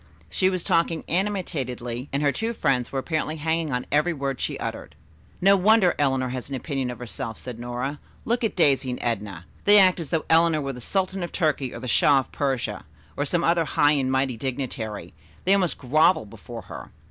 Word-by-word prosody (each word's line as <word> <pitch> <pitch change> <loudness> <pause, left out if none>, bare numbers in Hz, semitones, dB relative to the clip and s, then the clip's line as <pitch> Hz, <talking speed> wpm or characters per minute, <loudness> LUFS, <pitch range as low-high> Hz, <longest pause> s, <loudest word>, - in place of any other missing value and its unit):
She 185 - +3
was 185 -2 -1
talking 165 -1 +1
animatedly 140 - -2
and 140 +2 -1
her 140 - +4
two 225 +8 -2
friends 125 - 0
were 135 - -3
apparently 155 +2 -2
hanging 160 0 -1
on 125 0 -2
every 150 +4 +2
word 135 -3 -3
she - - -2
uttered. - - -6 0.4
"No 195 +2 +6
wonder 200 -1 +4
Eleanor 135 -3 +1
has 130 +1 -5
an 140 - -3
opinion 135 -2 -3
of 125 - -6
herself," 120 -1 -5
said 125 -2 -8
Nora. 125 +4 -4 0.3
"Look 235 +2 0
at 225 - 0
Daisy 135 -6 +3
and 125 - -3
Edna. 100 -7 -3 0.2
They 205 +1 +7
act 185 -2 +6
as 165 - -5
though 165 -2 -1
Eleanor 165 -1 +4
were 135 -1 -3
the 125 - -9
Sultan 190 +6 -1
of 175 - -4
Turkey 150 -6 0
or - - -7
the 130 - -6
Shah 140 +4 +4
of - - -15
Persia, 130 -7 -2 0.3
or 145 - -1
some 170 +3 0
other 170 0 +3
high 145 -1 +3
and 135 -3 +1
mighty 130 -2 0
dignitary. 120 -5 -4 0.3
They 190 - +5
almost 190 -4 +1
grovel 155 +1 +3
before 100 - -10
her." - - -9
145 Hz, 205 wpm, -25 LUFS, 125-170 Hz, 0.4 s, They